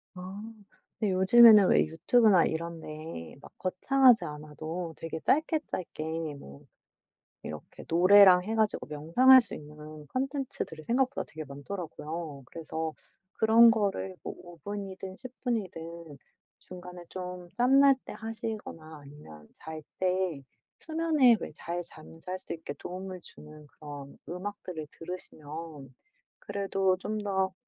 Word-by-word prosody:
아 185 +3 -8 0.6
근데 205 -3 +1
요즘에는 210 +2 +8
왜 - - +5
유튜브나 205 +1 +4
이런 165 0 -4
데에 155 - -8
막 - - -13
거창하지 240 +3 +4
않아도 155 +3 -6
되게 165 0 -5
짧게 315 +2 +2
짧게 165 -3 -5 0.3
뭐 70 - -13 0.8
이렇게 75 0 -9
노래랑 185 +1 +7
해 220 +4 -3
가지고 220 -2 0
명상할 170 - +6
수 235 - -5
있는 150 0 -10
컨텐츠들이 265 - -4
생각보다 260 +3 +1
되게 155 0 -7
많더라고요. 155 0 -6
그래서 160 0 -5 0.4
그런 230 +1 +6
거를 200 -3 -1
뭐 - - -5
5 175 -1 -13
분이든 195 +1 -6
10 255 -1 -9
분이든 170 - -4 0.4
중간에 180 -1 -11
좀 180 -1 -7
짬 250 +6 +4
날 280 0 +7
때 - - -8
하시거나 215 -8 -6
아니면 110 - -13
잘 160 -1 -9 0.2
때 185 -5 0 0.4
수면에 315 -7 +3
왜 - - -6
잘 175 +1 -4
잠잘 165 +3 -9
수 185 - -6
있게 160 -3 -7
도움을 185 +5 -7
주는 150 -1 -14
그런 145 -1 -10
음악들을 180 -3 -6
들으시면 155 -4 -9 0.5
그래도 195 -2 0
좀 215 +3 -4
더 190 -2 0
180 Hz, 265 characters per minute, -29 LUFS, 155-210 Hz, 0.8 s, 요즘에는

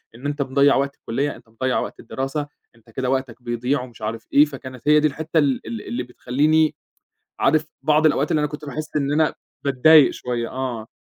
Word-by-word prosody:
إن 125 +4 -12
أنت 145 0 -2
مضيّع 140 +1 +3
وقت 140 +1 0
الكلية، 140 +5 -2
أنت 110 - -18
مضيّع 130 +3 -1
وقت - - -5
الدراسة، 135 +2 -4 0.3
أنت 115 0 -23
كده 125 +3 -3
وقتك 130 -2 -2
بيضيع 125 +3 -1
ومش 125 -2 -11
عارف 110 +1 -4
إيه، 145 +2 +7
فكانت 130 -2 -10
هي 150 0 +6
دي 155 - +3
الحتّة 160 +3 -3
ال 140 -6 +1
ال 115 -2 -5
اللي 125 +1 -3
بتخليني، 150 +6 +1 0.6
عارف 155 -1 +3 0.2
بعض 155 +2 +3
الأوقات 145 -1 +2
اللي 155 - +2
أنا 150 - +1
كُنت 150 +1 -8
باحِس 155 +2 -5
إن 140 -1 0
أنا 155 0 +2 0.3
باتضايق 140 +2 +6
شويّة، 120 -2 -3
آه. 125 -4 -4
135 Hz, 195 wpm, -22 LUFS, 125-150 Hz, 0.6 s, إيه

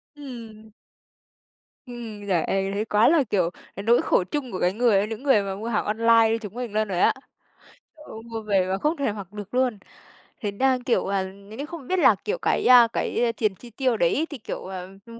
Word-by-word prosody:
Ừm. 230 -6 -10 1.2
Ừm. 230 -4 -8
Giời 180 -4 +1
ơi! 195 0 -1
Thấy 210 +2 -1
quá 215 0 +3
là, 315 -2 +4
kiểu, 195 -7 0 0.3
cái 195 - -6
nỗi 235 +3 +4
khổ - - +2
chung 260 +6 -4
của 185 - -4
cái 180 +1 +1
người 210 -3 +2
những 225 +3 -7
người 265 -7 +4
mà 195 -1 -4
mua 215 +4 -6
hàng 235 - 0
online 225 +1 +4
như 225 - +1
chúng 210 -3 -8
mình 240 -2 -5
luôn 215 0 +1
rồi 185 -3 -2
á. - - +4 0.8
Ôi, 300 -8 -11
mua 225 -1 -6
về 195 -4 +1
mà 190 +1 -1
không 300 +10 0
thể 280 -6 0
mặc 200 -3 -8
được 210 +1 -8
luôn. 250 -3 +1 0.6
Thế 205 -3 -2
đang, 255 +4 +1
kiểu, 245 -2 +1
à, 195 -1 0
những 200 +3 -11
cái 285 - -4
không 315 -4 -9
biết 370 - 0
là, - - +6
kiểu, 455 +4 -1
cái, - - 0
à, 245 -2 +8
cái 235 -1 0
tiền 215 -4 0
chi 240 - -13
tiêu 245 0 0
đấy 210 - +2
thì, 290 - -7
kiểu, 225 - -6
ờ, 185 -1 -6 0.2
ừm, 230 0 -12
220 Hz, 225 wpm, -24 LUFS, 200-250 Hz, 1.2 s, à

